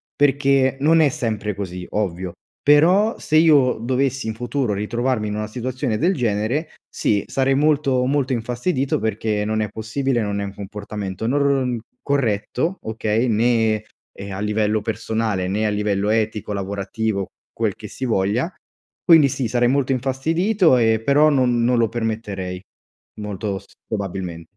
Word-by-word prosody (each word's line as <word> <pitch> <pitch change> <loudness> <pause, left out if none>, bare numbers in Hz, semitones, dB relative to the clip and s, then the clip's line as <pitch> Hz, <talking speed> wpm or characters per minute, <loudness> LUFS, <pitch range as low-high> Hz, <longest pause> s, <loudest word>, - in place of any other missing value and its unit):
perché 135 -1 +3
non 165 +2 +5
è 150 - +5
sempre 110 -7 -3
così, 90 -2 -5
ovvio, 90 -4 -2 0.3
però 180 +9 +4
se 155 - +1
io 150 -6 +5
dovessi 130 +1 -1
in 110 - -3
futuro 120 -1 -1
ritrovarmi 115 +2 -1
in 105 - -3
una 105 0 -3
situazione 125 +1 -3
del 180 - +2
genere, 120 +5 -1 0.2
sì, 100 -2 0
sarei 135 0 +1
molto, 140 -3 +2
molto 135 -1 0
infastidito 125 +4 -1
perché 105 -1 -1
non 110 0 0
è 105 - -2
possibile, 120 +4 -1
non 100 -1 -2
è - - -2
un 100 - -7
comportamento 100 0 -6
nor 135 -2 +1 0.2
corretto, 135 - -1
okay, 110 +2 -1
né 110 -1 +2 0.3
e 100 0 -8
a 95 - -5
livello 105 0 0
personale, 110 -4 -2
né 105 +3 0
a - - +2
livello 105 -1 0
etico, 110 -1 -1
lavorativo, 100 +1 -2 0.3
quel - - -1
che - - -9
si 130 - -5
voglia. 115 - 0 0.5
Quindi 160 -5 +7
sì, 125 -1 -2
sarei 120 +1 +2
molto 135 0 +1
infastidito 160 - +2
e 110 -1 +2
però 145 +3 +5
non 125 -4 +2
non 120 +1 +3
lo 115 -2 +2
permetterei 105 -5 -4 0.6
molto 105 -1 -4
s - - -19 0.2
probabilmen 95 -5 -4
115 Hz, 150 wpm, -21 LUFS, 105-135 Hz, 0.6 s, Quindi